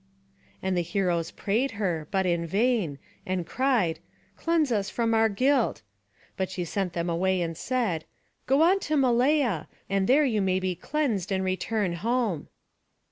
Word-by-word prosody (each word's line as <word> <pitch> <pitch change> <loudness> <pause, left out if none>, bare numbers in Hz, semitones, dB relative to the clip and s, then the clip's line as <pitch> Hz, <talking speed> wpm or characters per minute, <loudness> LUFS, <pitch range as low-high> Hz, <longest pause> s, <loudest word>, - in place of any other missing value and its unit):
And 190 0 0
the 175 - +2
heroes 175 -1 0
prayed 230 +7 -1
her, 170 -7 -1
but 190 -1 0
in 170 -2 0
vain, 205 - +1 0.3
and 185 -2 -2
cried, 230 -5 +1 0.4
"Cleanse 330 -5 +1
us 205 -3 0
from 230 -1 0
our 225 0 +4
guilt!" 255 - +1 0.5
But 190 -1 -1
she 185 -2 -3
sent 185 +1 -2
them 170 0 -2
away 185 +2 +1
and 165 -1 -2
said, 215 -8 -1 0.4
"Go 275 +4 +4
on 375 +4 +4
to 310 -5 -1
Malea, 250 - +2 0.2
and 195 -1 +1
there 290 +3 +5
you 220 -6 +1
may 185 -1 +1
be 185 -1 -1
cleansed, 215 - -2
and 190 -1 0
return 185 +1 -1
home." 215 - -1
195 Hz, 160 wpm, -27 LUFS, 175-250 Hz, 0.5 s, there